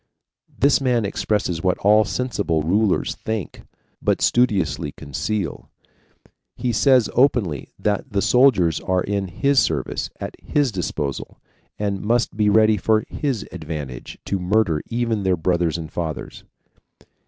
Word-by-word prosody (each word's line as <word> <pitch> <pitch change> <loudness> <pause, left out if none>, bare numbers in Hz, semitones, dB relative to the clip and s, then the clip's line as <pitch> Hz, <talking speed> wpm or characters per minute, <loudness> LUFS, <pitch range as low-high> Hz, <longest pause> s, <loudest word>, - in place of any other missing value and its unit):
This 140 0 +2
man 125 -4 +1
expresses 100 -4 -1
what 90 0 +1
all 105 +2 +4
sensible 100 -9 -1
rulers 100 +4 +1
think, 110 -4 -4 0.4
but - - +1
studiously 100 -11 +1
conceal. 85 +6 -4 0.9
He 125 -1 -2
says 130 0 +4
openly 115 - +1
that 105 +5 -2
the 100 -1 0
soldiers 110 - +4
are 95 -1 0
in 100 -1 -2
HIS 140 +10 +2
service, 80 -10 -1
at - - -6
HIS 145 -4 +1
disposal, 75 - -4 0.4
and 100 -2 -2
must 120 +1 0
be 105 -1 +2
ready 110 +1 +4
for 110 +2 +2
HIS 135 -8 -2
advantage 75 -7 -7
to 100 - -1
murder 90 -3 +1
even 115 -2 -1
their 95 -2 +1
brothers 85 -1 0
and 80 -1 -7
fathers. 80 -3 -5
100 Hz, 130 wpm, -22 LUFS, 85-115 Hz, 0.9 s, all